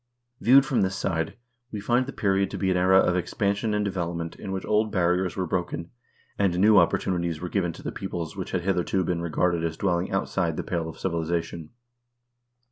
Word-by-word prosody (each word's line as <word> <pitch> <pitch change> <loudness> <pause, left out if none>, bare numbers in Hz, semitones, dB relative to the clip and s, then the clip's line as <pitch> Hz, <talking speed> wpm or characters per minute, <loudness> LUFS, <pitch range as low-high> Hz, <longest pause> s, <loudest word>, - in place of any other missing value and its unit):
Viewed 135 +3 +6
from 135 -3 +1
this 95 0 0
side, 80 -3 -2 0.4
we 105 - -4
find 120 +5 +1
the - - -4
period 100 -4 +1
to - - -5
be 95 -1 +1
an - - +1
era 95 +1 +5
of 90 -2 +4
expansion 100 +4 0
and 105 0 0
development 85 -3 -3
in 95 - -7
which 95 0 -3
old 105 0 +1
barriers 90 0 +1
were 95 - 0
broken, 85 -1 -3 0.5
and 95 -3 +2
new 105 +2 +6
opportunities 85 -2 0
were 90 - -5
given 90 -3 0
to - - -12
the - - -3
peoples 80 -1 -5
which 95 -2 -5
had 90 - -1
hitherto 95 0 +1
been 85 -1 -1
regarded 85 0 0
as 80 -1 -2
dwelling 90 -2 0
outside - - -1
the - - -2
pale 85 -2 -2
of - - -10
civilization. 85 -2 -2
90 Hz, 200 wpm, -26 LUFS, 85-100 Hz, 0.5 s, Viewed